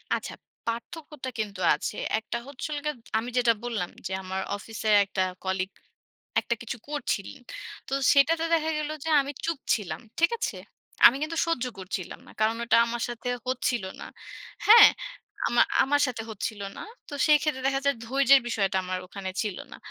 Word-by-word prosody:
আচ্ছা। - - -5 0.3
পার্থক্যটা 260 +4 -5
কিন্তু 205 -3 -3 0.2
আছে। 150 - -4 0.2
একটা 220 +2 -4
হচ্ছিল 285 +2 -5
গিয়া 300 - 0 0.3
আমি 235 +2 -5
যেটা 240 -2 +5
বললাম 225 -7 -2 0.2
যে, - - -8
"আমার 190 +1 -3 0.2
অফিসে 220 +1 -4 0.2
একটা 190 -1 -1 0.2
কলিগ 190 0 -1 0.7
একটা 235 - -1
কিছু 235 0 -5
করছিলেন।" 255 -8 -3 0.5
তো - - -4 0.2
সেটাতে 320 +4 +4
দেখা 320 -1 +2
গেল 305 0 -2
যে 320 - -3
আমি 275 +1 -5
চুপ 330 -4 -1
ছিলাম। 205 0 -3 0.2
ঠিক 340 - +5
আছে? - - -2 0.5
আমি 240 - +9
কিন্তু 315 +2 -2
সহ্য 330 -7 0
করছিলাম 185 -1 -5
না। - - -13
কারণ 215 +1 +2
ঐটা 230 -1 +4
আমার 235 0 -3
সাথে 240 +1 -4 0.2
হচ্ছিল 250 -3 0 0.2
না, - - -6 0.6
হ্যাঁ? 460 +3 +11 0.6
আমা - - +4 0.2
আমার 290 +1 +2
সাথে 245 -3 -3
হচ্ছিল 215 0 -4 0.2
না। - - -6 0.3
তো - - -8
সেইক্ষেত্রে 300 -3 +3
দেখা 270 0 +1
যায় 280 -2 +3
ধৈর্যের 275 +2 +5
বিষয়টা 195 -4 0
আমার 185 0 -2
ওখানে 190 0 -6
ছিল 205 -4 -3
না। - - -9
240 Hz, 165 wpm, -27 LUFS, 210-290 Hz, 0.7 s, হ্যাঁ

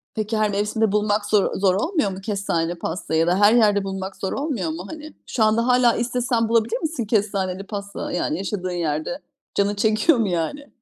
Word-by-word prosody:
Peki, 215 0 -1
her 215 -1 +2
mevsimde 210 +1 0
bulmak 210 0 +1
zor 210 -2 +2
zor 190 -1 +2
olmuyor 260 - 0
mu 190 +1 -7
kestaneli 190 -5 -1
pastayı? 160 -1 -2
Ya 165 - +2
da 180 +2 +2
her 205 +2 +6
yerde 210 -4 +4
bulmak 190 0 -5
zor 190 - -3
olmuyor 270 - -2
mu? 170 +4 -5
Hani, 310 -1 -9
şu 230 - 0
anda 220 +2 +2
hâlâ 250 -1 +4
istesen 240 -1 0
bulabilir 230 - +2
misin 315 -7 -2
kestaneli 195 -3 -1
pasta? 200 -1 -5
Yani, 170 -3 -1
yaşadığın 185 -1 -3
yerde 165 - -2 0.4
canın 200 +1 +1
çekiyor 220 +8 +3
mu, 225 -3 +1
yani? 180 - -2
205 Hz, 190 wpm, -22 LUFS, 190-230 Hz, 0.4 s, her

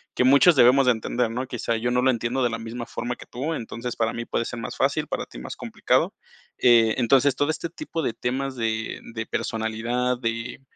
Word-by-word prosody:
que - - +2
muchos 140 +6 +6
debemos 130 +2 +6
de 125 - +6
entender, 115 +1 -1
¿no? 125 +2 -3
Quizá 115 -1 -2
yo 120 +2 -1
no 125 +1 +1
lo 130 - +5
entiendo 120 +2 -1
de 120 - +1
la 115 - -3
misma 115 +1 -6
forma 125 0 -4
que - - -12
tú, 140 +7 -4
entonces, 120 +1 -5
para 115 0 0
mí 115 - -4
puede 115 - -1
ser 120 - -5
más 110 - -6
fácil, - - +1
para - - -3
ti - - -11
más - - -7
complicado. - - 0 0.5
Eh, 115 -2 +5
entonces, 135 +2 +4
todo 145 +3 0
este 165 +1 -2
tipo 170 - -5
de 115 - -1
temas 130 +3 -3
de 110 -1 -2 0.2
de 115 0 -3
personalidad, 115 +4 -2
de 115 +2 -3
120 Hz, 215 wpm, -24 LUFS, 115-130 Hz, 0.5 s, muchos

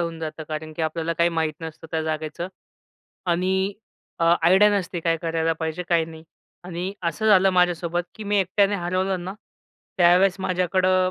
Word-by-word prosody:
होऊन 165 -1 -3
जातं. 155 0 -5
कारण 155 0 -5
की 165 - -2
आपल्याला 165 +1 -1
काही 170 0 +4
माहीत 160 -2 -1
नसतं 160 0 -8
त्या 160 -1 -1
जागेचं. 155 +2 -3 0.8
आणि 180 +2 +1 0.6
अ, 165 - +1 0.2
आयडिया 190 +5 +6
नसते 175 -1 -4
काय 165 0 +1
करायला 165 0 0
पाहिजे 160 +1 -3
काय 170 -2 +3
नाही? 160 0 -11 0.4
आणि 180 +2 -4 0.2
असं 220 +6 -3
झालं 195 -2 +6
माझ्यासोबत 175 -1 +1
की 215 - -8
मी 205 0 +1
एकट्याने 200 +2 +2
हरवलं 185 0 -1
ना, 190 +2 -5 0.6
त्यावेळेस 180 +2 +5
माझ्याकडं 185 0 +2
175 Hz, 160 wpm, -24 LUFS, 160-185 Hz, 0.8 s, आयडिया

